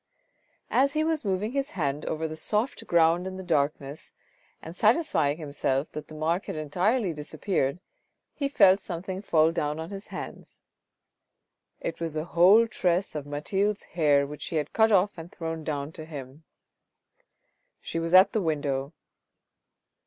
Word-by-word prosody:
As 275 +2 +3
he 310 0 +1
was 320 -1 0
moving 200 +2 -1
his 275 +1 -1
hand 145 -2 -1
over 160 +1 -2
the 155 - -6
soft 210 +10 -2
ground 170 +2 +3
in 185 0 -6
the 190 - -6
darkness 145 -3 -1 0.5
and 165 +2 -10
satisfying 215 - +2
himself 140 -2 -2
that 150 0 -7
the 155 - -11
mark 165 +4 -1
had - - -4
entirely 180 - 0
dis 150 -1 -6
appeared, 165 -6 0 0.5
he 280 - -1
felt 195 -7 +6
something 185 +1 -5
fall 160 -5 +3
down 150 -2 -2
on 160 +3 -6
his 195 0 -7
hands. - - -9 1.2
It 165 - -4
was 165 -2 -3
a 155 +1 -2
whole 185 +7 +6
tress 185 -4 0
of 150 -2 -5
Mathilde's 195 +8 -1
hair 145 -4 +3
which 150 +1 -9
she - - -5
had 150 -2 -2
cut 220 0 +4
off 195 -2 +3
and 165 +2 -9
thrown 165 -1 -5
down 145 -1 -3
to 160 -1 -9
him. 145 0 -9 1.3
She 165 - -4
was 165 +2 +1
at 190 +2 +8
the 220 - +1
window. 145 -3 -1
165 Hz, 160 wpm, -27 LUFS, 150-195 Hz, 1.3 s, at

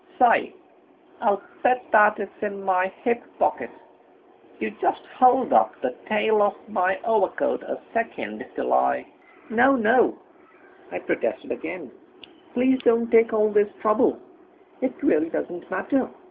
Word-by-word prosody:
Say, 245 -2 +4 0.7
I'll 205 -3 +1 0.2
bet 250 0 +2
that 210 -1 +5
it's 200 -1 -8
in 200 -2 -4
my 190 0 +1
hip 240 0 0 0.2
pocket. - - 0 0.9
You - - -3
just - - 0 0.2
hold 255 0 +4
up - - +4
the - - -2
tail 215 0 +2
of 205 -1 +3 0.2
my 190 -2 0
overcoat 215 -5 0
a - - -5 0.2
second 110 - -4
till 65 - -1
I...." 65 0 +1 0.5
"No, 255 +5 +4
no," 230 +1 +3 0.7
I - - -4
protested - - -3
again, - - -6 0.6
"please 260 +1 +2
don't 230 0 +2
take 230 0 +5
all 215 -1 +2
this 205 0 +2
trouble, 215 0 +2 0.6
it 260 0 0
really 320 +2 +2
doesn't 175 - -5
matter. 245 +8 -1
215 Hz, 135 wpm, -24 LUFS, 195-240 Hz, 0.9 s, that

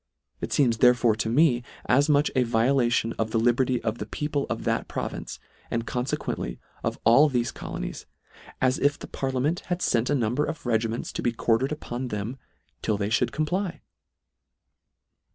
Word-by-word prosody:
It - - -4
feems 120 -6 +2
therefore 120 -2 +5
to 110 - -1
me 125 -1 +4 0.2
as 140 +4 +3
much 145 0 +3
a 130 - +4
violation 120 0 +2
of 110 -1 0
the 115 - 0
liberty 120 +2 +2
of 115 0 -2
the - - -4
peo 150 - -3
ple 145 -2 0
of - - -3
that - - 0
province, - - -5 0.3
and 115 0 -2
confequently 125 +2 -3 0.3
of - - -1
all 135 +7 +6
thefe 120 -3 0
colonies, - - -6 0.5
as 130 0 +2
if 145 +1 +2
the - - -8
parliament 135 +5 -1
had 175 0 -2
fent 120 0 +1
a 145 - +3
number 125 +3 +1
of 160 -1 -4
regiments 115 -1 -1
to - - -3
be 120 - +1
quartered 115 +3 +1
upon 130 -4 -4
them 110 +4 -4 0.4
till 110 -2 0
they 100 0 -1
fhould 110 +2 +2
comply. 165 +6 -2
125 Hz, 170 wpm, -26 LUFS, 115-140 Hz, 0.5 s, all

